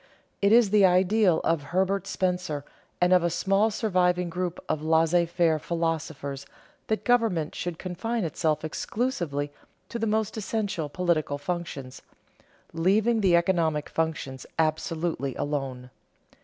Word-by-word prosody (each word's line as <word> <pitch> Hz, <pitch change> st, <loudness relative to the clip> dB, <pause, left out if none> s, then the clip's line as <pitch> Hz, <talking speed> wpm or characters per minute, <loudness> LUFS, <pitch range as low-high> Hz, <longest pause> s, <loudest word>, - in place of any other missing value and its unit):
_ -, -, -31 dB, 0.4 s
It 200 Hz, 0 st, +4 dB
is 230 Hz, -3 st, +5 dB
the 210 Hz, -1 st, +5 dB
ideal 185 Hz, 0 st, +4 dB
of 165 Hz, -2 st, +1 dB
Herbert 190 Hz, +6 st, 0 dB
Spencer 180 Hz, -6 st, -2 dB, 0.3 s
and 180 Hz, +1 st, +4 dB
of 180 Hz, -, +6 dB
a 170 Hz, -, +2 dB
small 195 Hz, +5 st, +2 dB
surviving 180 Hz, -5 st, +1 dB
group 180 Hz, -1 st, -3 dB
of 150 Hz, -, -1 dB
laissez 165 Hz, +2 st, +3 dB
faire 170 Hz, -2 st, +2 dB
philosophers 155 Hz, -4 st, -3 dB, 0.4 s
that 220 Hz, -, -1 dB
government 225 Hz, -11 st, +2 dB
should 175 Hz, -2 st, -4 dB
confine 210 Hz, +6 st, -3 dB
itself 155 Hz, -1 st, -1 dB
exclusively 155 Hz, -, -2 dB, 0.4 s
to 235 Hz, -, -4 dB
the 225 Hz, -, 0 dB
most 220 Hz, 0 st, 0 dB
essential 205 Hz, -6 st, -2 dB
political 155 Hz, -3 st, 0 dB
functions, 155 Hz, -6 st, -5 dB, 0.7 s
leaving 210 Hz, +7 st, +2 dB
the 185 Hz, -3 st, +4 dB
economic 170 Hz, -4 st, +1 dB
functions 155 Hz, -5 st, -3 dB
absolutely 160 Hz, -3 st, -1 dB
alone. 135 Hz, -4 st, -3 dB
175 Hz, 130 wpm, -26 LUFS, 155-195 Hz, 0.7 s, of